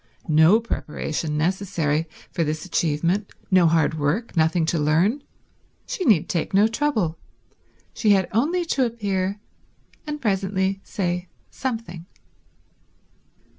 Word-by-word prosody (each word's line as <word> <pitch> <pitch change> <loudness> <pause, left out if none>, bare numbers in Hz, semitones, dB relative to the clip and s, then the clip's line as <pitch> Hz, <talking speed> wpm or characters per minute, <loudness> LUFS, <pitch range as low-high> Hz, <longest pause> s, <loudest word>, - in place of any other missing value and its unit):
No 160 +8 +6
preparation 155 -7 -3
necessary 165 -3 0 0.2
for 170 - 0
this 155 +2 -3
achievement, 175 +3 0 0.2
no 185 -2 +6
hard 160 -1 +2
work, 160 +12 -1
nothing 160 +1 +2
to 165 0 0
learn. 170 - +2 0.6
She 370 - -3
need 180 - +4
take 170 +2 -2
no 205 +2 +6
trouble. 225 - -1 0.7
She 215 - 0
had 195 -3 +4
only 325 - +1
to 275 -5 +1
appear, 200 -4 -1 0.7
and 300 0 -4
presently 195 -3 0
say 180 -3 -3 0.2
something. 220 -10 -5
185 Hz, 115 wpm, -23 LUFS, 160-215 Hz, 0.7 s, No